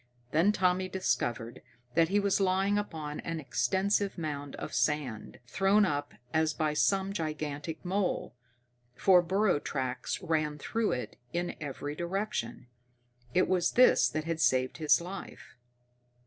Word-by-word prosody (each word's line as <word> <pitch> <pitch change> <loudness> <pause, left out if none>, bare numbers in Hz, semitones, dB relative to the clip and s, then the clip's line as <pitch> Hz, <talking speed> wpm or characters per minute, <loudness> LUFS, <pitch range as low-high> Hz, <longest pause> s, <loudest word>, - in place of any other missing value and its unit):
Then 165 +7 +4
Tommy 185 -1 +1
discovered 120 -11 -2 0.3
that 165 +2 +3
he 205 +2 +3
was 200 -1 +2
lying 195 +2 +2
upon 155 -7 -5
an 165 -1 -4
extensive 195 +6 0
mound 145 -4 -4
of - - -7
sand, 125 -3 -1
thrown 195 +9 +3
up 145 -4 -2 0.2
as 160 0 +2
by 155 -1 0
some 195 +5 +1
gigantic 155 -2 -4
mole, 190 +1 -1 0.6
for 180 +5 +5
burrow 190 -1 +2
tracks 130 -3 -3
ran 155 -3 0
through 225 +8 -1
it 125 - -5 0.2
in 175 +1 -2
every 145 0 -5
direction. 175 - -3 0.7
It 185 - +4
was 180 -2 +1
this 240 - +6
that 155 +5 -3
had 165 0 -2
saved 130 -3 +2
his 155 +1 +4
life. 185 +3 -9
165 Hz, 135 wpm, -30 LUFS, 150-190 Hz, 0.7 s, this